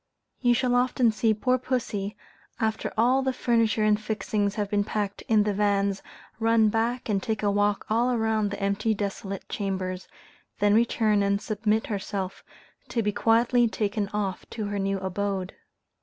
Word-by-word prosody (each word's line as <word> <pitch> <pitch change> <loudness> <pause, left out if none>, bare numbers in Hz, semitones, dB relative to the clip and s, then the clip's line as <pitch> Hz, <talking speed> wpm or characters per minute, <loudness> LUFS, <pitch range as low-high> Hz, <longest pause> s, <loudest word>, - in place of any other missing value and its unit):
You 245 -1 +3
shall 250 0 +1
often 245 -1 +3
see 220 +1 +1
poor 250 +4 +1
pussy, 220 -5 -3 0.4
after 220 -1 -1
all 250 +4 +4
the 265 0 0
furniture 230 -3 +1
and 215 0 +3
fixings 210 -1 -1
have 210 -2 -1
been 205 0 +1
packed 205 -1 -3
in 215 -2 +4
the 210 0 0
vans, 200 -1 +1 0.4
run 225 -1 +4
back 230 +3 -1
and 200 -3 0
take 220 0 -2
a 205 - +3
walk 205 0 +1
all 240 +3 +2
round 220 -2 +1
the 200 - -5
empty 200 +2 0
desolate 195 -1 -4
chambers, 190 -2 -3 0.5
then 205 0 +3
return 220 -2 +3
and 200 0 +1
submit 215 +1 0
herself 195 -2 -4 0.4
to 230 - -1
be 210 - +1
quietly 235 +3 +3
taken 205 0 -1
off 200 -3 -3
to 220 -2 -4
her 205 0 -3
new 195 0 0
abode. 190 0 -3
210 Hz, 165 wpm, -26 LUFS, 200-225 Hz, 0.5 s, all